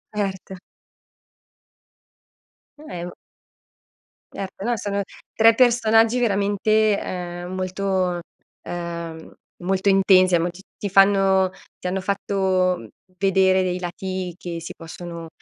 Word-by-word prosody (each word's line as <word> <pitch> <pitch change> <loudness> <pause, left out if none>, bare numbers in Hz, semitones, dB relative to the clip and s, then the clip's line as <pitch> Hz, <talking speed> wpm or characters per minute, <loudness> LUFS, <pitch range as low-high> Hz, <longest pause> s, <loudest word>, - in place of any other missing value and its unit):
Erto. 195 -2 -3 2.2
È 235 - -7
u 175 0 -7 1.2
Erto, 195 0 -6
no 240 0 +1
sono 200 -1 -2 0.3
3 225 +1 +6
personaggi 230 -1 +4
veramente, 210 0 +2
ehm, 175 0 -5
molto 185 -1 -1 0.4
ehm, 170 -2 -6 0.3
molto 190 +2 0
intensi 185 -2 +5
mo 170 +2 0
ti 180 +2 -12 0.2
ti 205 - -4
fanno 195 -1 +4 0.3
ti - - -4
hanno 190 +1 -1
fatto, 190 -2 +1
mhmm, 115 - -11 0.3
vedere 190 -1 +3
dei 180 0 -1
lati 185 0 -4
che 170 -3 -6
si 165 - -8
possono, 170 0 -8
190 Hz, 110 wpm, -22 LUFS, 180-200 Hz, 2.2 s, 3